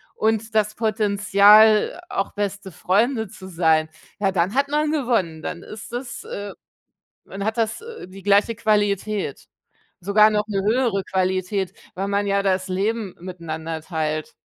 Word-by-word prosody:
und 220 0 0
das 215 0 +2
Potenzial, 210 - +4
auch 195 - -2
beste 200 -1 -4
Freunde 220 +7 +1
zu 190 0 -11
sein, 160 -3 +2 0.3
ja, 195 -2 +1
dann 185 +3 +1
hat 280 +1 +2
man 300 +1 0
gewonnen. 230 - 0
Dann 170 - -5
ist 215 +2 -10
es 245 0 -5
äh, 205 0 -6 0.7
dann 195 +1 -6
hat 220 +1 -1
das, 225 - -1
äh, 460 - -9
die 190 +1 -12
gleiche 205 +3 +3
Qualität. 205 -5 0 0.6
Sogar 210 +4 +5
noch 210 0 +1
'ne 195 -2 -1
höhere 225 -2 +1
Qualität, 185 +1 -1 0.2
weil 195 +2 -3
man 200 0 0
ja 200 0 +1
das 185 -1 0
Leben 200 +1 -2
miteinander 165 -3 -6
teilt. 155 -2 -3
200 Hz, 150 wpm, -22 LUFS, 185-220 Hz, 0.7 s, Sogar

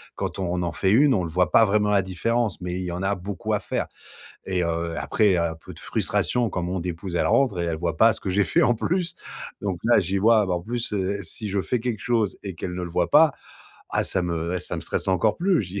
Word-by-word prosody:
quand - - -4
on 90 -1 -1
en 85 - -1
fait 95 - 0
une, 135 +5 +5
on 95 - 0
le 85 - -4
voit 90 0 +1
pas 115 - +6
vraiment 105 0 +2
la 100 -1 +4
différence, 110 +4 -1
mais 90 0 -3
il - - -3
y 90 - -3
en 90 +1 -4
a 100 +1 +1
beaucoup 95 0 -4
à - - +2
faire - - -3 0.6
et 90 -2 0
heu, 85 0 -2
après 105 -2 +2
il - - +3
y - - +2
a 85 -1 0
un - - -8
peu 80 - -12
de - - -12
frustration 120 -2 0
quand 90 - -2
mon 90 +2 -2
épouse, 90 +1 -5
elle - - +1
rentre 115 -4 +2
et - - 0
elle 85 -2 -2
voit 85 -1 -2
pas 115 +3 +6
ce - - -10
que 95 - -3
j'ai 100 +2 +3
fait - - +2
en 120 - +3
plus 175 - -1 0.5
donc 95 -4 -2
là 120 -1 +5
j'y 95 +1 -1
vois 110 +1 +4
bah 90 - 0
en 85 - -3
plus, 115 +3 -4
heu, 100 0 -1
si 105 +5 -3
je 100 0 0
fais 120 +8 -1
quelque 115 -3 -3
chose 115 -5 0
et 100 -2 -5
qu'elle 90 +2 -5
ne 90 - -3
le 85 - -5
voit 85 - 0
pas. 150 -1 +6 0.6
Ah - - +1
ça 95 - 0
me 85 0 -2
eh - - -3
ça - - -4
me - - -5
stresse - - -2
encore 95 +3 +2
plus. 180 - +2
Je 95 - -8
dis 100 +2 -5
95 Hz, 285 wpm, -24 LUFS, 90-110 Hz, 0.6 s, pas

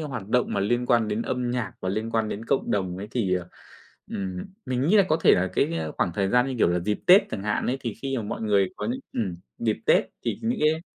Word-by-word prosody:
hoạt 130 -10 -5
động 125 +2 +2
mà 100 - 0
liên 120 +5 +1
quan 115 -3 +3
đến 105 +2 -1
âm 125 -1 -2
nhạc 125 -2 -2
và 95 - -3
liên 110 +4 -2
quan 110 -1 0
đến 105 +2 -5
cộng 135 - 0
đồng 95 -3 -1
ấy 100 +2 -6
thì, 100 -8 0
ờ, 90 -1 -3 0.6
ừm, 95 -2 -4 0.3
mình 130 0 -1
nghĩ 210 - +5
là 200 - +7
có 155 - +3
thể - - +6
là 90 +1 +1
cái 85 0 +1 0.2
khoảng 85 - 0
thời 100 +1 +1
gian 125 +4 +3
như 135 - -3
kiểu - - +4
là 85 +1 +1
dịp 105 +4 -1
Tết 190 +3 +8
chẳng 100 - -4
hạn 105 0 -1
ấy, 125 - 0
thì 115 -4 -4
khi 135 -1 -1
mà 115 - -2
mọi 105 - -5
người 100 -3 +2
có - - -4
những 250 +3 -2
ừm, 95 -7 -2 0.2
dịp 110 -2 0
Tết - - +5 0.2
thì - - -1
những 230 +1 0
cái 155 +1 +3
110 Hz, 270 wpm, -25 LUFS, 100-125 Hz, 0.6 s, Tết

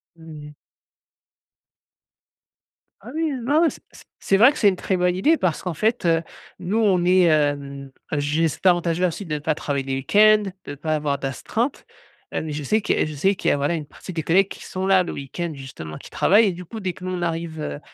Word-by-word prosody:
Mmh 160 -3 -11
mh. 150 - -11 2.5
Ah 225 - -11
oui. 320 -1 -1 0.2
Ah 300 +3 +4
ouais. 335 -2 +4
C - - -11
c - - -15 0.2
c'est 195 - +2
vrai 240 +6 +7
que - - -9
c'est 205 - +5
une 185 - -1
très 190 - -1
bonne 180 0 +1
idée, 300 - +3
parce 175 -4 -1
qu'en 180 -2 -3
fait, 220 +5 0
heu, 165 0 +2 0.4
nous 180 +5 -2
on 195 -6 +3
est, 180 +1 +4
hem, 145 -3 0 0.3
juste 150 +4 -1
avantagés 175 -1 +3
ensuite 180 +2 -3
de 150 -1 -2
pas 155 +1 -1
travailler 140 -2 -2
les 135 0 -2
week-ends, 210 +9 +4 0.2
de 145 - -6
pas 155 +2 -2
avoir 145 -2 -1
d'astreinte, 225 - -3 0.5
heu, - - -1
mais 155 -1 -5
je 150 0 -4
sais 215 +10 +1
que - - +1
je 155 - -5
sais 190 +7 +1
qu'il - - 0
y - - +4
a, - - +2
voilà, 145 +4 0
une 155 -3 -5
partie 185 - -10
des 160 -2 -3
collègues 190 +3 +3
qui - - -10
sont 190 +1 -3
là 190 -1 +5
le 175 - -5
week-end 165 +5 -5
justement, 130 - -9
qui - - -12
travaillent 210 +2 +4
et - - +1
du 180 +1 -8
coup, 220 +6 -8
dès 190 -3 -3
que 185 - -14
nous 185 - -3
on 180 -1 -3
arrive, 165 -1 -3
heu, 70 - -4
170 Hz, 230 wpm, -22 LUFS, 150-195 Hz, 2.5 s, vrai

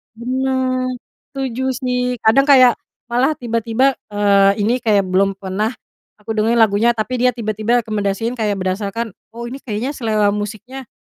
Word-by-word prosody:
Benar, 255 +1 -1 0.5
setuju 260 -1 -2
sih. 250 -1 -1
Kadang 270 +6 +4
kayak 255 -4 +6 0.3
malah 260 +6 +2
tiba-tiba, 235 +2 0 0.2
eee, 200 0 +3
ini 235 +4 +1
kayak 215 -5 +2
belum 195 +1 +2
pernah 195 +5 -3 0.4
aku 210 +1 -11
dengerin 220 +1 +1
lagunya, 220 +3 +3
tapi 240 +3 -2
dia 250 - +2
tiba-tiba 225 +1 0
rekomendasiin, 215 +3 -2
kayak 210 -2 0
berdasarkan, 200 +4 -3 0.2
“Oh 235 0 -6
ini 270 - -6
kayaknya 230 +1 -4
selera 215 -7 +1
musiknya 220 +6 -6
230 Hz, 140 wpm, -18 LUFS, 210-255 Hz, 0.5 s, kayak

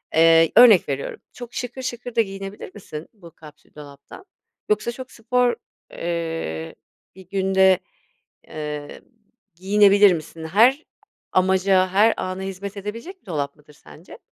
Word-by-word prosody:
Eee, 165 0 +5
örnek 225 -10 +7
veriyorum 140 0 -4
çok 245 -1 -10
şıkır 250 +1 -5
şıkır 245 -1 -6
da 230 - +4
giyinebilir 195 -1 -7
misin 160 -6 -9
bu 175 -6 -15
kapsül 150 -1 -17
dolaptan? 145 - -13 0.4
Yoksa 210 +3 0
çok 255 +2 -10
spor, 245 +1 0 0.4
eee, 165 - -4 0.4
bir 185 -1 -16
günde, 190 -1 +3 0.7
eee, 150 -1 -7 0.5
giyinebilir 200 +1 +5
misin? 160 0 -7
Her 240 - +3 0.5
amaca, 190 0 +2
her 205 +5 +3
ana 185 +1 -4
hizmet 195 +1 -7
edebilecek 230 - -8
bir - - -40
dolap 145 -5 -4
mıdır 150 0 -21
sence? 75 - -15
190 Hz, 130 wpm, -22 LUFS, 165-215 Hz, 0.7 s, örnek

